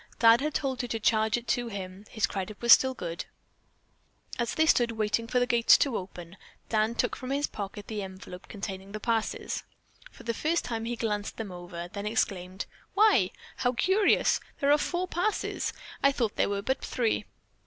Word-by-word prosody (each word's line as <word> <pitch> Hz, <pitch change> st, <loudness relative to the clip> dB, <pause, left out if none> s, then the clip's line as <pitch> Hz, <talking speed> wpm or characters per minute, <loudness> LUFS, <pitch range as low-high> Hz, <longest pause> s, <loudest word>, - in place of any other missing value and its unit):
Dad 230 Hz, +1 st, +6 dB
had 305 Hz, +1 st, -2 dB
told 270 Hz, -3 st, -1 dB
her 245 Hz, -, -4 dB
to 225 Hz, -1 st, -2 dB
charge 220 Hz, +1 st, +2 dB
it 240 Hz, 0 st, -8 dB
to 245 Hz, -2 st, +1 dB
him. 195 Hz, -2 st, -7 dB
His 220 Hz, -1 st, +1 dB
credit 200 Hz, 0 st, -5 dB
was 235 Hz, -1 st, +8 dB
still 260 Hz, 0 st, +4 dB
good. 170 Hz, -5 st, -5 dB, 1.1 s
As 235 Hz, -, -1 dB
they 315 Hz, -, +4 dB
stood 240 Hz, -6 st, +3 dB
waiting 220 Hz, +1 st, 0 dB
for 250 Hz, -, 0 dB
the 245 Hz, -, +3 dB
gates 235 Hz, -2 st, +6 dB
to 275 Hz, -5 st, +1 dB
open, 180 Hz, -1 st, -7 dB, 0.3 s
Dan 220 Hz, +1 st, +1 dB
took 245 Hz, -, 0 dB
from 255 Hz, -, -7 dB
his 280 Hz, +2 st, +1 dB
pocket 205 Hz, -2 st, -6 dB
the 215 Hz, -2 st, -4 dB
envelope 190 Hz, -1 st, -9 dB
containing 195 Hz, -1 st, -6 dB
the 215 Hz, -, -4 dB
passes. 225 Hz, 0 st, -1 dB, 0.5 s
For -, -, -15 dB
the 235 Hz, -, -1 dB
first 320 Hz, +8 st, 0 dB
time 225 Hz, -2 st, -3 dB
he 240 Hz, +1 st, -2 dB
glanced 210 Hz, -3 st, -2 dB
them 220 Hz, -4 st, -5 dB
over, 175 Hz, -1 st, -7 dB
then 200 Hz, +3 st, -5 dB
exclaimed: 190 Hz, -3 st, -1 dB, 0.3 s
"Why, 395 Hz, -, +5 dB, 0.3 s
how 245 Hz, -1 st, +1 dB
curious! 380 Hz, -, +3 dB, 0.2 s
There 285 Hz, -1 st, +3 dB
are 295 Hz, -, +6 dB
four 355 Hz, +4 st, -1 dB
passes! 365 Hz, +5 st, -1 dB, 0.3 s
I 275 Hz, -, +5 dB
thought 235 Hz, -6 st, -1 dB
there -, -, +2 dB
were 200 Hz, 0 st, -2 dB
but 265 Hz, +4 st, -1 dB
three. 235 Hz, -4 st, 0 dB
225 Hz, 190 wpm, -28 LUFS, 200-255 Hz, 1.1 s, was